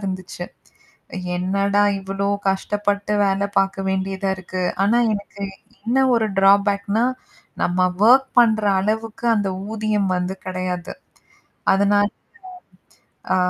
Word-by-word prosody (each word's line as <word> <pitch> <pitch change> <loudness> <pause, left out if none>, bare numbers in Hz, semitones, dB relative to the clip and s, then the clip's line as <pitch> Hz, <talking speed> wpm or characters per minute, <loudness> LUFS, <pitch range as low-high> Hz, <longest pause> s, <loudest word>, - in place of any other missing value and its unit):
இருந்துச்சு. 185 -2 -5 0.9
என்னடா 200 +2 +1 0.2
இவ்வளோ 195 +1 -3 0.2
கஷ்டப்பட்டு 205 +1 -1
வேலை 195 +1 0
பாக்க 195 0 +2
வேண்டியதா 190 0 -2
இருக்கு. 185 0 -5 0.2
ஆனா, 215 +4 +3 0.2
எனக்கு 200 -1 -6 0.4
இன்னும் 260 +3 +2
ஒரு 220 -1 +1
டிராபேக் 200 +1 +3
-னா, 230 - +3 0.6
நம்ம 180 +1 +2
வொர்க் 255 +5 +6
பண்ற 220 -3 +4 0.2
அளவுக்கு 220 +3 -3
அந்த 205 -2 0 0.2
ஊதியம் 210 -3 0
வந்து 180 +1 -2
கெடையாது. 185 -1 -4 0.8
அதனால 205 +1 +3 1.3
ஆ, - - +3
200 Hz, 105 wpm, -21 LUFS, 190-210 Hz, 1.3 s, வொர்க்